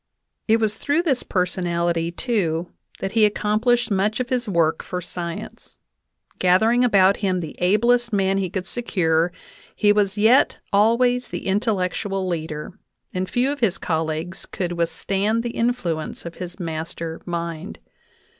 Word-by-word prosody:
It 225 0 +5
was 215 -1 0
through 295 +4 +1
this 270 -7 +1
personality, 175 -2 0
too, 175 -5 -1 0.3
that 195 - -2
he 215 -2 +5
accom 210 +1 0
plished 240 -1 +2
much 205 +3 +1
of 250 -1 -2
his 245 -3 -1
work 165 -4 +2
for 180 - -4
science. 170 -1 -7 0.6
Gathering 220 +7 +4
about 200 -5 +5
him 185 -3 0
the 160 -3 -6
ablest 235 +6 +3
men 195 -1 +2
he 190 -2 -1
could 185 0 -4
secure, 175 -8 0 0.4
he 205 -1 +4
was 205 -1 +1
yet 225 +6 +4 0.2
always 245 +4 +3
the - - -5
intel 205 +3 +1
lectual 190 +1 -2
leader, 160 -1 -4 0.3
and 185 0 -2
few 255 +3 +1
of 290 - -4
his 200 -7 +1
colleagues 160 +2 -3
could 180 -2 -3
withstand 190 +7 0
the 240 - -3
influence 230 -13 -2
of 170 - -6
his 180 +1 -7
master 165 -1 -5
mind. 170 +1 -4
195 Hz, 150 wpm, -22 LUFS, 170-225 Hz, 0.6 s, It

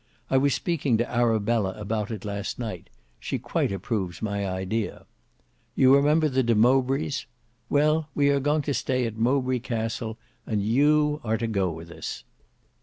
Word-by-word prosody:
I 135 - +4
was 140 +1 +3
speaking 145 -9 0
to 120 +2 0
Arabella 115 -4 +1
about 105 0 -2
it 110 -1 -6
last 100 0 -4
night; 110 -8 -6 0.3
she - - -3
quite - - -1
approves 95 -2 -3
my 100 -2 -2
idea. 95 +4 -3 0.7
You 130 0 +6
remember 150 +3 +4
the 135 -2 +1
De 120 -2 +2
Mowbrays? 130 +5 +2 0.4
Well, 150 +2 +2
we 140 -1 +3
are 140 0 +3
going 145 +2 +1
to 145 - -1
stay 130 -2 0
at 115 -1 -4
Mowbray 130 +2 +1
Castle, 115 -2 -3 0.3
and 105 -3 0
you 150 +6 +3
are 110 -1 0
to 115 - -2
go 100 -5 0
with 85 +1 -8
us. - - -6
120 Hz, 165 wpm, -26 LUFS, 105-140 Hz, 0.7 s, You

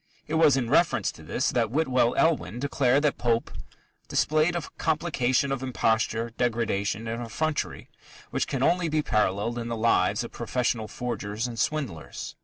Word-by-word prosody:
It 150 - -6
was 160 -4 +5
in 125 -3 0
reference 165 +7 +2
to - - -15
this - - -1
that 115 -2 +1
Whitwell 130 -3 +2
Elwin 120 - +1
declared 140 0 +2
that 150 - +1
Pope 115 -1 0 0.6
"displayed 155 +3 +2
a 170 - -2 0.2
complication 140 -5 +1
of 135 -2 -2
imposture, 115 -2 0
degradation, 115 -2 0
and 115 +2 -3
effrontery 150 +7 -2 0.4
which - - 0
can 135 -1 -1
only 175 +2 +2
be 155 0 +1
paralleled 105 +1 0
in 115 - -4
the 115 -1 -3
lives 115 +1 +2
of - - -7
professional 120 -3 -1
forgers 110 -1 -4
and 120 -2 -5
swindlers." 125 - -3
125 Hz, 160 wpm, -26 LUFS, 115-150 Hz, 0.6 s, was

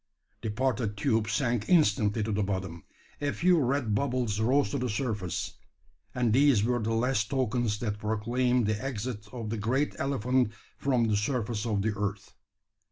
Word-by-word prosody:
The 110 - -3
parted 115 -2 -1
tube 110 -1 +1
sank 120 0 0
instantly 110 - +3
to 110 - -2
the 105 0 0
bottom; 95 -4 -3 0.4
a 145 0 0
few 180 +2 +3
red 130 -4 0
bubbles 120 -2 0
rose 125 +1 +2
to 140 - -1
the 125 0 -1
surface; 105 - -3 0.6
and 120 -3 +2
these 135 -5 +5
were 120 +2 +1
the 110 +1 -1
last 115 -2 +1
tokens 120 -5 0
that 105 -3 -2
proclaimed 120 +3 +1
the 110 +2 -1
exit 115 -4 -4
of 115 -4 -5
that 115 - -2
great 130 +7 0
elephant 130 -3 +1 0.3
from 130 -4 +2
the 110 -2 +2
surface 110 0 -1
of 105 -3 0
the 110 0 0
earth. 100 0 -4
115 Hz, 165 wpm, -29 LUFS, 105-130 Hz, 0.6 s, these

